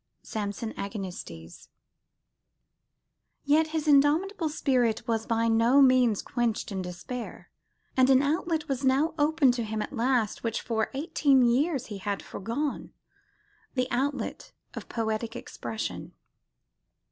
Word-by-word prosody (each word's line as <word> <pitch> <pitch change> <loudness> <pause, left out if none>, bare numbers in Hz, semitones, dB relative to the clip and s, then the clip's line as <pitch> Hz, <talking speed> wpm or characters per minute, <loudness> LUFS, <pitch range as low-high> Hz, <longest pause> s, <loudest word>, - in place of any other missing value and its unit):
(Samson 215 +1 -4
Agonistes). 180 - -7 1.8
Yet 310 +2 +3
his 310 -1 -3
indomitable 310 +5 +3
spirit 255 -7 0
was 225 -1 -1
by 230 0 +1
no 230 +4 +4
means 255 -5 +4
quenched 235 -3 -2
in 190 -1 -3
despair: 185 +7 -7 0.4
and 260 0 +4
an 265 0 +5
outlet 320 +1 -1
was 270 -1 -2
now 270 +5 +2
open 295 -2 +4
to 245 -1 -2
him 220 0 -3
at 210 - -4
last, 235 -3 0
which 230 -1 -1
for 220 -2 -1
eighteen 280 -2 +3
years 265 +4 +2
he 205 -2 -7
had 200 +1 -3
foregone, 270 +9 -4 0.8
the 255 -1 +1
outlet 275 +3 -2 0.2
of - - -8
poetic 225 0 -2
expression. 220 -2 -6
245 Hz, 125 wpm, -28 LUFS, 220-285 Hz, 1.8 s, an